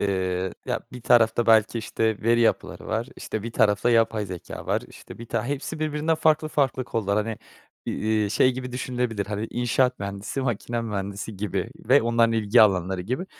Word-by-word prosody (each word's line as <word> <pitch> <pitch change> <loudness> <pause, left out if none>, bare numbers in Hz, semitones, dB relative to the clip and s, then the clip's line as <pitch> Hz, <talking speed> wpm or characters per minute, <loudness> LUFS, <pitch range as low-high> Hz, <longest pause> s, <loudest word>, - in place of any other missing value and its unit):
eee, 95 -2 -1
ya - - -1
bir 125 - -8
tarafta 120 -1 +4
belki, 110 +1 +4
işte, 110 -1 -1
veri 120 +1 +3
yapıları 115 - 0
var, 115 +3 -2
işte, 110 - -5
bir 115 0 -6
tarafta 105 +2 +3
yapay 115 -2 +2
zekâ 90 -2 -8
var, - - 0
işte, - - -13
bir 115 - -8
tane 115 +2 -2
hepsi 145 +2 -4
birbirinden 155 +1 0
farklı 155 -1 +2
farklı 135 -4 0
kollar. 105 -4 -1
Hani, 115 -2 -4 0.5
eee, 110 -1 0
şey 130 +3 +3
gibi 125 0 -6
düşünülebilir. 125 -4 -2
Hani, 105 +2 -3
inşaat 125 +1 +1
mühendisi, 100 +6 -4
makine 120 -1 -2
mühendisi 100 -1 -5
gibi 100 +1 -3 0.2
ve 135 0 +6
onların 115 0 +3
ilgi 110 +1 +4
alanları 95 -2 +2
gibi 125 - -3
115 Hz, 175 wpm, -25 LUFS, 105-125 Hz, 0.5 s, ve